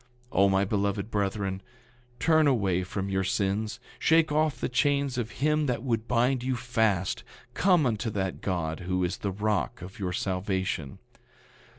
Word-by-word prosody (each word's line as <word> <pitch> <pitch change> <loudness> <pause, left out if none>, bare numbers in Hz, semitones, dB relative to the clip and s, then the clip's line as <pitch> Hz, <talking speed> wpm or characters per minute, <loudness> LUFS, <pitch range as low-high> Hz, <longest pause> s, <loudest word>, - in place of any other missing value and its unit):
9:45 - - -7
O, 100 0 +6
my 95 0 +3
beloved 100 +1 -1
brethren, 100 -1 -1 0.6
turn 160 -2 +4
away 95 -9 +2
from 95 +2 -4
your 95 -1 0
sins; 100 +3 -1 0.2
shake 160 -1 +4
off 155 -1 +1
the - - -1
chains 140 0 +1
of 115 -2 -2
him 150 +5 +1
that 125 -2 -1
would 115 -3 -1
bind 125 +2 +2
you 130 +1 -1
fast; 110 -7 0 0.3
come 175 +1 +4
unto 115 -1 0
that 95 -3 -3
God 80 -4 -2
who 90 0 -1
is 90 +1 -1
the 100 - -2
rock 100 - -1
of 95 +5 -10
your 90 -2 -2
salvation. 95 - -2
105 Hz, 165 wpm, -28 LUFS, 95-125 Hz, 0.6 s, O